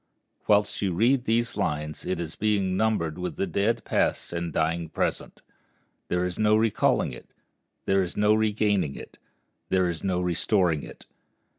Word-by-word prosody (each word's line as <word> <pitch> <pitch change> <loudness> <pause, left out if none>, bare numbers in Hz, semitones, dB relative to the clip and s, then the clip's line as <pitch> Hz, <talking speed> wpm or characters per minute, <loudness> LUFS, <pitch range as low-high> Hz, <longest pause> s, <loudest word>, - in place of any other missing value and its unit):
Whilst 105 0 +2
you 95 -3 0
read 120 +6 +2
these 120 0 +1
lines 75 -6 -3
it 95 -2 -2
is 80 -2 -4
being 100 -3 0
numbered 95 -6 0
with 90 - -4
the - - -1
dead 100 +6 0
past - - 0
and 85 0 -3
dying 80 +1 -1
present. - - -3 0.6
There 90 0 0
is 90 -1 -4
no 105 0 +4
recalling 110 -1 +2
it; - - -11 0.6
there 95 0 +3
is 90 -2 -4
no 105 +1 +4
regaining 105 -7 +1
it; - - -11 0.5
there 95 -1 +2
is 85 -2 -4
no 95 -2 0
restoring 90 -2 +1
it. - - -12
95 Hz, 160 wpm, -26 LUFS, 85-105 Hz, 0.6 s, no